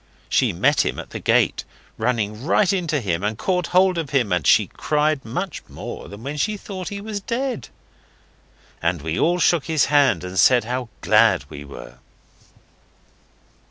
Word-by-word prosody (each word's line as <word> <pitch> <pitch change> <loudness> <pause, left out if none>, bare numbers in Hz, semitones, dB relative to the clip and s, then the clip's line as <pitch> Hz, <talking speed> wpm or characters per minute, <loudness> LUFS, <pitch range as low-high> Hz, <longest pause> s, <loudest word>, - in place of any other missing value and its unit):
She - - +2
met - - +2
him - - -2
at - - -8
the - - -5
gate, - - +2 0.3
running 110 -1 -2
right 190 +5 +2
into 170 -6 0
him, 90 -4 -2
and 105 +1 -1
caught 180 +2 -1
hold 185 -1 +3
of 155 -4 -4
him, 125 -8 +1
and 90 -6 0
she - - +5
cried 150 -1 -1
much 180 +12 -4
more - - -8
than 100 +3 -11
when 145 +3 -5
she 210 +8 -1
thought 190 -2 -7
he 200 - -6
was 205 0 -5
dead. 250 +4 -3 1.1
And 85 -2 -1
we 80 +1 -2
all 175 +2 +2
shook 170 -3 +2
his 160 -3 +2
hand 140 - +4
and 90 +1 -3
said 125 -2 +5
how 125 +1 -4
glad - - +4
we 70 - -9
were. 65 -3 -11
145 Hz, 170 wpm, -22 LUFS, -, 1.1 s, she